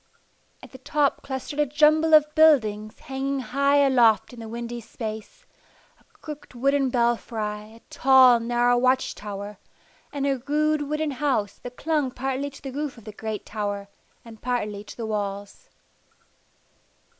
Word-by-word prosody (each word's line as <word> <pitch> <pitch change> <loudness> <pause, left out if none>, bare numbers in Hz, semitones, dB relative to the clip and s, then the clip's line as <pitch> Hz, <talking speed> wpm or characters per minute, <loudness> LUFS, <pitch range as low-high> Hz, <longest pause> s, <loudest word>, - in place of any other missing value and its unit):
At - - -12
the 260 - -12
top 290 +1 0
clustered 275 +2 -6
a 295 - +4
jumble 310 +3 +4
of 300 0 +4
buildings 220 -10 +3
hanging 270 +1 -3
high 280 +2 +2
aloft 240 -5 +3
in 240 - -11
the 225 - -8
windy 235 +1 -6
space 220 - -8 0.5
a - - -28 0.2
crooked 300 -4 -9
wooden 275 +2 +1
belfry, 225 -3 -2
a 230 - -17
tall, 260 -2 +6
narrow 240 +1 +2
watch 255 +1 +2
tower, 205 0 -8 0.5
and 280 -1 -3
a 275 -2 0
rude 305 +1 +1
wooden 305 0 -1
house 260 -7 -1
that 245 0 -10
clung 300 -4 0
partly 265 +2 -3
to 275 - -15
the 270 - -5
roof 285 -1 -4
of 230 - -14
the 215 - -8
great 215 0 -5
tower 205 -2 -4 0.4
and 225 -2 -13
partly 210 -5 -2
to - - -11
the 230 - -4
walls. 205 - -5
250 Hz, 155 wpm, -24 LUFS, 220-285 Hz, 0.5 s, tall